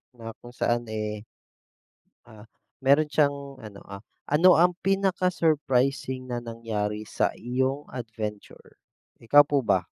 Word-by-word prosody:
na 115 -1 -8
kung 120 +1 -14
saan 120 -1 0
eh, 105 0 -5 1.0
ah, 110 0 -14 0.3
meron 145 +3 +3
siyang 140 -2 0
ano, 105 -4 -11
ah, 100 0 -7 0.3
ano 175 +5 +6
ang 175 +2 +4
pinaka-surprising 150 -9 0
na 120 - -2
nangyari 110 -3 -4
sa - - -1
iyong 130 +4 -2
adventure? 110 -4 -8 0.4
Ikaw 145 +6 +6
po 145 -1 0
ba? - - +2
125 Hz, 120 wpm, -26 LUFS, 110-145 Hz, 1.0 s, ano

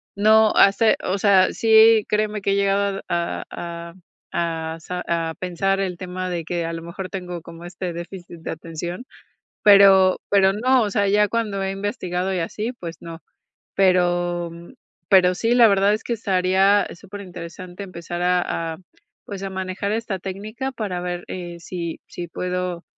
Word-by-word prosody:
no 215 +1 +5
hace 215 +3 +5
o 195 +2 -1
sea, 195 -2 +4
sí, 220 -1 +6
créeme 210 0 0
que 200 - 0
he - - +2
llegado 200 0 +1
a 170 0 -2
a 170 0 -7 0.4
a 165 -1 -2
sa 180 +2 -5
a 165 -1 -1
pensar 195 +2 -1
el 185 -3 -2
tema 185 +1 -5
de 170 -2 -3
que, 170 +1 -3
a 165 - -4
lo 165 - -5
mejor, 170 +3 -7
tengo 180 -3 -6
como 170 +1 -11
este 175 0 -5
déficit 175 0 -9
de - - -6
atención, 170 +6 -6 0.6
pero 195 -2 +7
pero 195 -1 +4
no, 250 +5 +3
o 210 - -1
sea, 200 0 +1
ya 205 +1 +3
cuando 210 -4 -2
he 190 - -1
investigado, 190 -2 -3
y 180 - -1
así, 215 +8 -3
pues 170 -8 -8
no, 165 0 -9 0.5
pero 175 -2 +2 0.6
pero 185 -2 +5
sí, 230 +5 +1
la 240 -2 +8
verdad, 200 0 +3
es 215 - -5
que 240 - -3
estaría 195 -1 +2
súper 200 +3 -10
interesante 180 +1 -9
empezar 175 -2 -6
a 175 -2 0
a, - - -10 0.5
pues, 200 -2 -7
a 195 - -4
manejar 190 +1 -3
esta 215 -3 -2
técnica 215 +8 -5
para 210 -8 -4
ver, 175 0 -4
eh, 175 -2 -6
si 170 -1 -5
si 175 -1 -7
puedo, 180 0 -3
185 Hz, 170 wpm, -22 LUFS, 175-200 Hz, 0.6 s, la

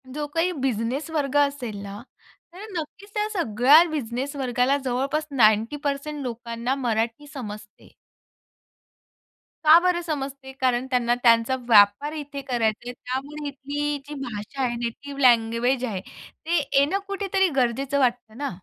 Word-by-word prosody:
जो 295 +3 -4
काही 330 +5 0
बिझनेस 265 +1 -2
वर्ग 290 -3 -1
असेल 280 -6 0
ना, 200 +1 -8 0.5
तर 385 +4 -9
नक्कीच 330 +6 -7
त्या 420 0 0
सगळ्या 280 - +5
बिझनेस 275 -1 -3
वर्गाला 255 0 +1
जवळपास 275 +5 -1
90% 280 +5 +1
लोकांना 235 +1 -3
मराठी 235 +1 -2
समजते. 215 -5 -9 1.7
का 310 +2 +9
बरं 355 0 +1
समजते? 275 -4 -5
कारण 250 -1 +2
त्यांना 240 -1 +2
त्यांचा 230 +1 +4
व्यापार 210 +6 +5
इथे 290 -2 -6
करायच 235 -5 0
आहे. 245 - -4
त्यामुळे 275 +4 -5
इथली 285 +1 -3
जी 295 - -7
भाषा 230 +3 -6
आहे, 240 -1 0
नेटिव्ह 260 +4 -5
लँग्वेज 240 +1 +3
आहे 200 -6 -4 0.4
ते 340 +2 +1 0.2
येणं 300 +8 +2
कुठेतरी 390 -1 +1
गरजेचं 270 +4 0
वाटतं 240 -3 0
ना? 285 +1 -2
265 Hz, 130 wpm, -24 LUFS, 235-295 Hz, 1.7 s, का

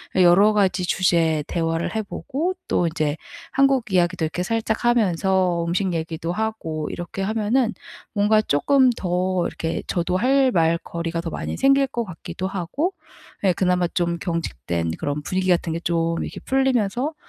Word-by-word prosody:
여러 190 +3 +6
가지 195 -3 +2
주제에 165 -4 +2
대화를 165 +2 -1
해 - - +1
보고 285 - -3 0.2
또 175 - +2
이제 155 -2 -1 0.3
한국 270 -5 +2
이야기도 180 -1 +2
이렇게 160 +3 -2
살짝 225 +4 -1
하면서 190 -6 +2
음식 185 +2 0
얘기도 165 0 -3
하고 180 -7 -3
이렇게 175 +3 -6
하면은 225 +3 +1 0.4
뭔가 210 +1 +3
쪼끔 255 - +3
더 180 -3 -1
이렇게 165 0 -4
저도 180 0 -1
할 265 +7 +3
말 165 0 +3
거리가 170 0 -4
더 170 - -4
많이 - - -4
생길 275 0 +4
것 240 -3 -3
같기도 180 0 -6
하고 195 - -2 0.5
예 190 - +4
그나마 180 -1 +1
좀 170 0 -1
경직된 85 - -2
그런 145 +1 -3
분위기 185 +2 -1
같은 170 -2 +2
게 165 - -2
좀 165 -1 0
이렇게 - - -6
풀리면서 265 0 0
185 Hz, 325 characters per minute, -22 LUFS, 170-220 Hz, 0.5 s, 여러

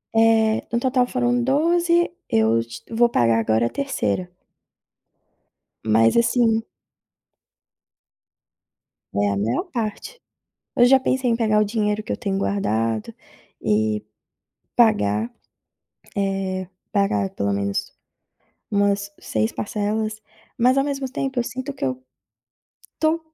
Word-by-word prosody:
Eh, 225 -1 +4
no 235 - +1
total 255 0 +2
foram 245 -1 +2
12, 340 +6 +3 0.4
eu 110 0 +3
j 115 +1 -10 0.2
vou 240 0 +5
pagar 115 - +3
agora 110 +1 +2
a - - 0
3ª. 270 -9 -1 1.6
Mas 110 +1 +4
assim 235 -1 +3 2.6
É 100 - +2
a 100 - -1
maior 110 +4 -1
parte. 225 - -4 0.6
Eu 245 - +6
já 265 +2 +6
pensei 260 -1 0
em 230 - +2
pegar 215 -2 +2
o - - +4
dinheiro 210 0 -1
que - - -11
eu - - -1
tenho 200 -4 -2
guardado, 115 - -1 0.5
e 105 0 +1 0.7
pagar, 110 - +3 0.9
eh, 195 -2 -1 0.2
pagar 105 - +1
pelo 100 0 -1
menos 100 0 -2 0.8
umas 200 0 +1
6 110 0 -1
parcelas, 215 +1 -2 0.4
mas 255 +2 +3
ao 275 - +3
mesmo 275 -2 -3
tempo 265 0 -3
eu 240 - +1
sinto 260 +4 -5
que - - -4
eu 130 -1 -2 1.0
tô 315 +1 +2
215 Hz, 120 wpm, -22 LUFS, -, 2.6 s, Eu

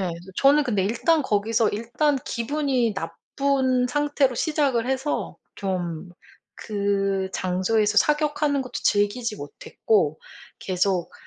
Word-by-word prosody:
예 190 - -1
그래서 175 +2 -6
저는 285 +2 +5
근데 205 -6 0
일단 295 +9 +2
거기서 220 +1 +1
일단 245 +7 0
기분이 255 -2 0
나쁜 255 +9 0
상태로 290 -2 +1
시작을 270 -4 0
해서 265 +2 -2 0.2
좀 175 -3 -4 0.5
그 195 -2 -1
장소에서 205 +4 0
사격하는 295 -1 +1
것도 255 - -11
즐기지 210 +2 +1
못했고 155 +3 -1 0.4
계속 185 -1 -1
225 Hz, 255 characters per minute, -24 LUFS, 195-275 Hz, 0.5 s, 저는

